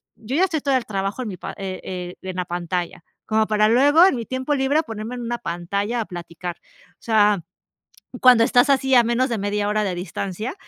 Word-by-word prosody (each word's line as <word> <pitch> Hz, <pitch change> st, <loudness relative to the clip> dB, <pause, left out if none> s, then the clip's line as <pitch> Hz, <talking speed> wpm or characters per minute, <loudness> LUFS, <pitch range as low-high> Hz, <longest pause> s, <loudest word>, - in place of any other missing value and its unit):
"Yo 225 Hz, +4 st, -5 dB
ya 370 Hz, -, +4 dB
estoy 320 Hz, -5 st, -2 dB
todo 275 Hz, -1 st, +1 dB
el 250 Hz, -, -4 dB
trabajo 195 Hz, +3 st, -3 dB
en -, -, -5 dB
mi 190 Hz, -, -6 dB
pa -, -, -7 dB
eh 190 Hz, -1 st, -5 dB
eh, 180 Hz, -1 st, -6 dB
en 185 Hz, -1 st, -6 dB
la 180 Hz, -, -1 dB
pantalla 175 Hz, 0 st, -4 dB, 0.2 s
como 220 Hz, 0 st, +2 dB
para 215 Hz, 0 st, +3 dB
luego, 290 Hz, +8 st, +6 dB
en 385 Hz, -, +1 dB
mi 235 Hz, -2 st, -4 dB
tiempo 260 Hz, +5 st, -2 dB
libre, 280 Hz, +3 st, +2 dB
ponerme 225 Hz, -1 st, -6 dB
en 245 Hz, -, -6 dB
una 240 Hz, 0 st, -3 dB
pantalla 200 Hz, +7 st, -2 dB
a -, -, -4 dB
platicar". 175 Hz, -1 st, -7 dB, 0.4 s
O -, -, -51 dB
sea, 210 Hz, -5 st, +3 dB, 0.8 s
cuando 250 Hz, -3 st, +7 dB
estás 245 Hz, +4 st, +4 dB
así 265 Hz, -1 st, +3 dB
a 245 Hz, -, +7 dB
menos 240 Hz, +3 st, +1 dB
de 230 Hz, -, -1 dB
media 205 Hz, +1 st, -1 dB
hora 210 Hz, 0 st, +1 dB
de 190 Hz, -3 st, -2 dB
distancia. 195 Hz, -, -4 dB
215 Hz, 220 wpm, -22 LUFS, 190-255 Hz, 0.8 s, cuando